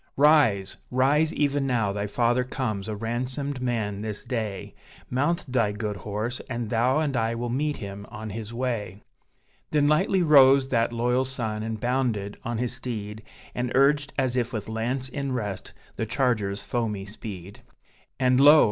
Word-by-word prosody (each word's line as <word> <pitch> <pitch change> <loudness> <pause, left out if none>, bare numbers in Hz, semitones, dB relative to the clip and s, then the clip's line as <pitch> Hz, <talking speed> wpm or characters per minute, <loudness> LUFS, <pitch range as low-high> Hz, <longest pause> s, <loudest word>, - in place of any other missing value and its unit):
"Rise, 140 -10 +4
rise! 145 +5 +3
even 145 -2 0
now 115 -6 +1
thy 100 +1 -2
father 120 +4 +2
comes 110 -6 -3
a 110 - -3
ransomed 125 +5 -3
man 110 -5 -1
this 105 -1 -4
day: 110 -6 -4 0.4
Mount 145 +7 +1
thy 115 -5 +1
good 105 -1 -3
horse, 105 +5 -4
and 120 -3 -3
thou 125 +4 +2
and 150 -4 0
I 115 0 0
will 120 0 -3
meet 145 +4 -1
him 100 -1 -7
on 110 0 -7
his 110 +1 -6
way." 115 -5 -3 0.7
Then 145 -1 +3
lightly 185 +5 +3
rose 135 -3 +6
that 115 -2 +2
loyal 125 +2 +1
son, 120 -5 -2
and 110 0 -4
bounded 120 -5 -1
on 120 -2 -3
his 125 +1 -1
steed, 110 -4 -5 0.3
And 125 0 -2
urged, 140 +1 +3
as 130 -2 +1
if 120 -2 0
with 110 -3 -4
lance 120 +4 -2
in 140 0 -3
rest, 105 -6 -4 0.3
the 115 - -2
charger's 110 -5 0
foamy 110 -5 -2
speed. 100 -2 -9 0.6
And 130 -1 +3
lo! 145 +3 +9
120 Hz, 165 wpm, -26 LUFS, 105-130 Hz, 0.7 s, lo